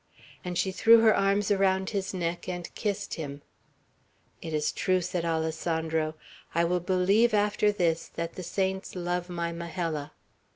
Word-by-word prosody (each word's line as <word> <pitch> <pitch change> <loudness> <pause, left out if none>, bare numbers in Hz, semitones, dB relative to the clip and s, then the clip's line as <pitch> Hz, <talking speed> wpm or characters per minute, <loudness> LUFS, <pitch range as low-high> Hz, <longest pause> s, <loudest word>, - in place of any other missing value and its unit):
and 180 -2 -3
she 190 +2 +1
threw 225 +4 +6
her 220 -1 +5
arms 200 +1 +2
around 190 -1 +2
his 195 -2 -2
neck 175 -2 -3
and 175 -2 -5
kissed 205 -1 -3
him. 145 -3 -6 1.0
"It 160 - -6
is 150 -1 0
true," 185 0 +1
said 175 -1 -2
Alessandro. 160 -1 -1 0.4
"I 170 - +3
will 180 +1 +1
believe, 195 +6 +3
after 210 0 +2
this, 170 -5 0
that 165 0 -3
the - - -7
saints 190 +2 -2
love 175 0 -2
my 170 -1 -2
Majella." 165 -3 -4
180 Hz, 155 wpm, -28 LUFS, 165-195 Hz, 1.0 s, threw